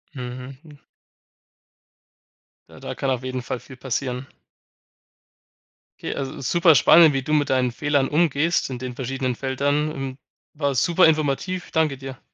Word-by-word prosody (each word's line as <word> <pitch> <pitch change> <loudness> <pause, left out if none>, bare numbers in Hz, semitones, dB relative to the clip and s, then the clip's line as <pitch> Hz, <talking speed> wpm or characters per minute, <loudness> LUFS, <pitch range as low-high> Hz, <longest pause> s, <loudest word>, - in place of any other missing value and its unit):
Mhm, 125 +1 -7
hm. 150 -3 -16 1.9
Ja, - - -14
da - - -6
kann 135 - -2
auf 130 -1 -1
jeden 130 0 -3
Fall 125 0 -4
viel 130 - -13
passieren. 130 0 -3 1.7
Okay, - - -4
also 135 -1 -5
superspannend, 160 +1 +6
wie 135 -1 -1
du 150 - -2
mit 150 -1 +2
deinen 130 -2 +1
Fehlern 145 0 +1
umgehst 160 +1 +1
in 125 -2 -5
den 125 -1 -6
verschiedenen 130 0 -3
Feldern. 145 +4 -1
Hm, 135 -3 -5 0.4
war 145 -2 -1
super 170 +8 +3
informativ. 155 +4 -1
Danke 155 -4 +1
dir. 135 0 -9
135 Hz, 140 wpm, -23 LUFS, 130-150 Hz, 1.9 s, superspannend